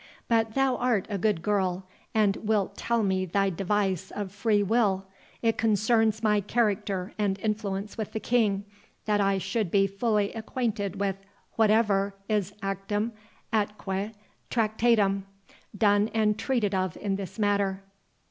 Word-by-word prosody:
But 225 -1 +1
thou 270 -2 +2
art 240 -6 +1
a 200 - -1
good 205 -5 +1
girl, 190 -2 0 0.3
and 210 -2 +3
wilt 205 -2 0
tell 235 +1 0
me 190 -1 +1
thy 195 +2 +1
device 190 0 0
of 200 -2 -5
free 205 +1 +2
will—it 200 +1 -1
concerns 220 0 +2
my 210 -1 +3
character 205 -3 0
and 200 -2 +1
influence 210 0 -3
with 215 - -3
the 220 - -2
King, 210 -4 +1 0.4
that 210 -1 +2
I 195 0 +2
should 195 +1 -1
be 195 +2 +4
fully 205 +1 0
acquainted 220 -4 -3
with 195 -1 0 0.4
whatever 210 -3 +3
is 205 -3 0
actum 195 +3 -2 0.4
atque 205 -1 -1 0.4
tractatum, 215 -3 +2 0.5
done 205 +1 +3
and 215 -1 +3
treated 220 -3 0
of 185 -3 -1
in 200 -2 -1
this 195 -1 -6
matter." 200 -2 +1
205 Hz, 140 wpm, -27 LUFS, 195-220 Hz, 0.5 s, be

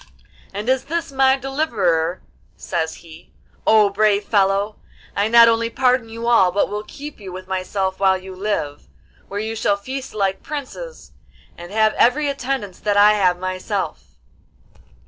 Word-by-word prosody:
'And 205 +3 -6
is 260 0 +1
this 330 -1 -3
my 265 0 +3
deliverer?' 205 - -1 0.3
says 160 -3 -3
he. 165 +1 -15 0.3
'O 215 -2 +5
brave 210 0 +2
fellow, 200 0 +1 0.4
I 200 +1 +1
not 235 +1 +7
only 230 0 +2
pardon 250 -1 +1
you 230 +1 -6
all, 230 -6 +4
but 200 - +1
will 210 +1 -3
keep 290 +6 -10
you 195 -3 -9
with 185 +1 -9
myself 190 0 -2
while 190 -1 +3
you 190 0 -10
live, 185 -7 -3 0.4
where 200 - -4
you 220 +1 -3
shall 205 -2 +1
feast 260 +5 -7
like 195 -2 0
princes, 310 - -7 0.4
and 175 +1 -10
have 215 0 +3
every 285 +5 +3
attendance 265 -8 -3
that 205 -1 0
I 205 +1 +7
have 185 -4 +2
myself. 185 - -4
210 Hz, 155 wpm, -20 LUFS, 190-250 Hz, 0.4 s, not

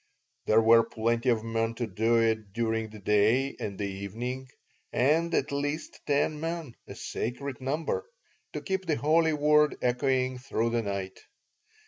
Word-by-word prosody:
There 110 +1 +5
were 115 +1 +7
plenty 115 +3 0
of 115 -2 +2
men 115 0 -1
to 120 - -2
do 110 +3 +2
it 110 -3 0
during 115 -1 -1
the 110 - -11
day 105 +7 +2
and 100 -2 -4
the 105 - -2
evening, 115 +7 -5 0.4
and 160 +6 +2
at 140 - 0
least 145 +2 -3
ten 150 +1 +1
men 165 -4 -4
(a - - -8
sacred 135 +3 -4
number) 150 - -2 0.4
to - - -4
keep 190 -2 -3
the 155 - +2
holy 160 +2 +3
word 150 0 +4
echoing 130 +1 +1
throughout 115 -3 -1
the 120 0 +1
night. 100 -2 -4
125 Hz, 155 wpm, -28 LUFS, 110-145 Hz, 0.4 s, were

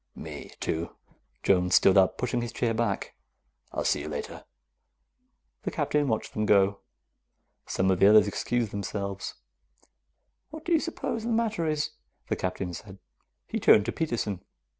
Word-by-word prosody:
"Me, - - -8
too." 80 +1 -3 0.5
Jones 90 -2 +3
stood 95 - +6
up, 95 -2 +4
pushing 125 -1 -1
his 120 -1 -4
chair 115 -1 0
back. 110 -3 -1 0.6
"I'll - - -2
see - - +2
you 75 - -5
later." 75 -1 -6 1.2
The - - -2
Captain 150 -1 0
watched 110 -3 -1
them 105 0 -1
go. 100 0 +4 0.9
Some 95 0 +1
of 90 - +1
the 100 - +7
others 105 0 +7
excused 115 +1 -1
themselves. 100 -1 -4 1.1
"What 315 +1 -10
do 345 - -3
you 330 - +5
suppose 315 -8 -3
the 230 - -3
matter 220 -7 0
is?" 155 -1 0 0.4
the - - +1
Captain 90 -1 -3
said. 95 +2 -9 0.5
He - - -3
turned 105 - +6
to 120 - -1
Peterson. 115 - -2
105 Hz, 155 wpm, -28 LUFS, 95-145 Hz, 1.2 s, the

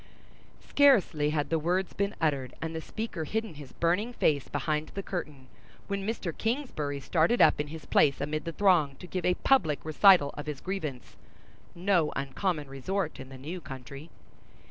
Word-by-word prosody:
Scarcely 205 - +4
had 150 0 -1
the 165 - +2
words 180 +4 0
been 200 +1 -1
uttered, 140 -5 -1
and 165 0 -4
the 160 - -4
speaker 215 -3 -5
hidden 220 +4 -3
his 145 -3 -11
burning 190 +8 0
face 145 - +1
behind 155 -1 -2
the 195 - -3
curtain, 150 -9 -5 0.4
when 200 0 -3
Mr. 195 -7 -3
Kingsbury 220 - -2
started 165 - +2
up - - +5
in 150 - -5
his 160 +1 -9
place 140 -2 +3
amid 155 +3 -3
the 165 - -3
throng, 165 -6 +3
to 155 - -11
give 180 0 -4
a 180 - +3
public 160 - +2
recital 155 -1 +5
of 145 +1 -7
his 150 -3 -4
grievance—no 175 +1 -3
uncommon 145 +3 -2
resort 160 +9 -3
in 130 - -9
the 135 - -10
new 165 +7 -6
country. 135 +3 -9
160 Hz, 165 wpm, -29 LUFS, 145-195 Hz, 0.4 s, up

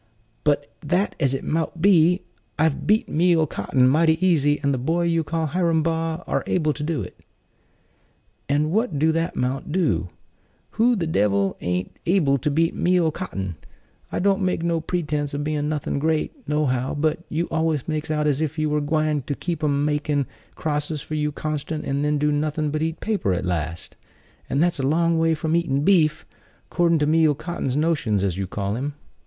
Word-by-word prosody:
"Be 150 -1 +4 0.3
that 180 +7 +1
as 135 -1 +2
it - - -4
mout 160 +1 -2
be, 180 -1 +4 0.3
I've 155 -1 +1
beat 215 +2 +3
Meal 165 0 +3
'Cotton 130 -3 +1
mighty 160 +4 +4
easy; 145 -5 +3
and 140 0 +2
the 130 - -1
boy 165 +7 0
you 165 -1 +1
call 160 +1 -2
Hiram 165 0 +1
Baugh 165 +1 -1
are - - -1
able 155 -4 +1
to 145 - -8
do 150 -6 -1
it." 90 - -10 1.3
"And 150 +2 +1
what 215 -5 0
do 160 +3 +3
that 165 +2 -1
'mount 130 +4 -2
to? 90 - +1 0.6
Who 235 +2 +3
the 180 -6 -1
devil 100 -9 +1
an't 90 +1 -2
able 155 -7 +3
to 150 - 0
beat 165 +3 +1
Meal 175 -2 +2
'Cotton! 95 - -5 0.5
I - - -2
don't 195 +1 +2
make 180 -3 0
no 170 -1 0
pretense 150 -4 -2
of 145 - -2
bein' 150 0 -1
nothin' 150 -2 -2
great, 155 +1 0 0.2
no 150 0 +1
how; 130 -1 -1
but 155 +2 0
you 165 +2 -1
always 160 -4 0
makes 155 -1 -3
out 150 -1 0
as 150 0 +1
if 160 0 -2
you 155 -1 0
were 150 0 +1
gwine 155 0 0
to 145 - -1
keep 170 0 -4
'em 145 -1 +1
makin' 150 -1 0 0.3
crosses 150 -1 -2
for - - -8
you 150 -1 0
constant, 155 +1 -4
and 140 +1 -1
then 150 0 +1
do 150 +1 +1
nothin' 150 0 -1
but 155 +1 -2
'eat 160 +1 -2
paper' 205 - 0
at 90 - -2
last; 85 -2 -3 0.5
and 140 +5 +2
that's 175 -4 +1
a - - 0
long 165 +4 +2
way 165 0 +3
from 160 +1 -1
eatin' 145 -5 +1
beef, 155 -5 +3 0.5
'cordin' 170 -1 +3
to 150 - +1
Meal 155 -1 +3
'Cotton's 145 -4 -3
notions, 145 - +1
as 95 -4 0
you 95 0 -3
call 100 +2 -3
him." 140 +4 -3
155 Hz, 195 wpm, -23 LUFS, 145-165 Hz, 1.3 s, Be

